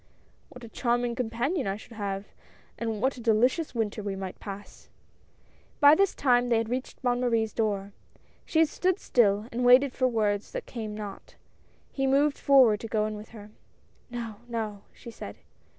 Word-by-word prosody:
What 250 - -13
a - - -8
charming 240 +1 0
companion 245 - -1
I 195 +1 -2
should 220 - -15
have, 200 -3 -4 0.5
and 225 -1 -3
what 265 0 +1
a - - -8
delicious 245 +7 +2
winter 220 -2 -1
we 200 -1 -3
might 190 -1 -6
pass! 200 0 -10 0.5
" - - -34
By 290 -1 +8
this 395 +4 +3
time, 245 -2 +3
they 235 - +3
had 225 0 -1
reached 255 +2 -4
Bonne 245 -1 +1
Marie's 230 -3 +1
door. 205 -3 -1 0.5
She 325 0 +3
stood 365 +4 0
still, 210 - +2
and 245 +2 -2
waited 250 +2 +6
for 255 - +2
words 210 -4 -1
that - - -4
came 220 -3 -6
not. 205 -2 -8 0.6
He 270 -1 -1
moved 280 +2 +2
forward 255 -7 +5
to 225 - -6
go 215 -1 0
in 215 0 -3
with 210 +1 -10
her. 210 -2 -12 0.6
"No, 230 -3 -6
no," 220 -4 -4
she 235 - -11
said. 100 - -8
230 Hz, 180 wpm, -27 LUFS, 210-255 Hz, 0.6 s, By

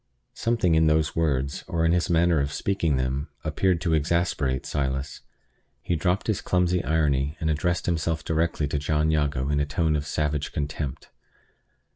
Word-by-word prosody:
Something 115 -7 +1
in 80 0 +4
those 80 +1 +2
words, 70 -4 0
or 80 -1 0
in 80 - +3
his 85 0 +1
manner 85 -1 +3
of 70 0 -1
speaking 80 -3 0
them, 65 +4 -2
appeared 85 +3 +1
to 85 - 0
exasperate 75 -4 0
Silas. 70 0 -2 0.6
He 90 - 0
dropped 90 +4 0
his 110 -4 -1
clumsy 90 -1 +1
irony, 75 -2 +1
and 80 0 0
addressed 85 +3 0
himself 80 -1 -1
directly 80 -2 0
to 75 - -1
John 75 +1 +1
Jago 75 -3 0
in 75 0 +1
a 75 - +1
tone 80 +1 +1
of 75 -1 -2
savage 75 -1 -1
contempt. 70 -1 -4
80 Hz, 165 wpm, -25 LUFS, 70-85 Hz, 0.6 s, in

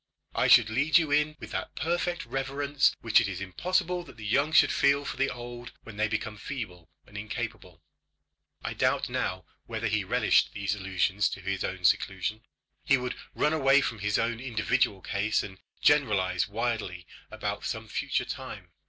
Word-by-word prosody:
I - - +2
should 115 -3 +7
lead 140 +9 +4
you 160 -4 +1
in 150 +1 +2
with - - -9
that - - -4
perfect 175 0 -1
reverence 135 +3 0
which 115 0 +5
it 110 - -1
is 95 -2 -4
impossible 180 - -1
that 115 - -14
the 105 - -9
young 140 +8 +2
should 155 - +6
feel 140 0 +3
for - - -4
the 135 0 +1
old 120 0 -8
when 115 -3 -11
they 110 +1 +2
become 105 0 -3
feeble 95 - -7 0.2
and 105 - -18
incapable." 105 -5 -6 0.8
I - - -3
doubt - - +1
now 90 -2 -2 0.2
whether 115 -1 -4
he 110 -2 +1
relished 95 - +2
these 100 -1 -1
allusions 95 +1 0
to - - -6
his 95 0 -2
own 90 -1 -3
seclusion. 95 +4 +1 0.4
He 135 - +4
would 125 0 -3 0.2
run 150 - +2
away 135 -2 +5
from 115 -4 -3
his 105 0 +1
own 115 0 0
individual 120 -4 0
case, 105 +3 0
and 95 -2 -9 0.2
generalise 95 - +3
widely 105 -5 -2 0.2
about - - -4
some - - -4
future - - -1
time. - - -7
115 Hz, 175 wpm, -28 LUFS, 100-135 Hz, 0.8 s, should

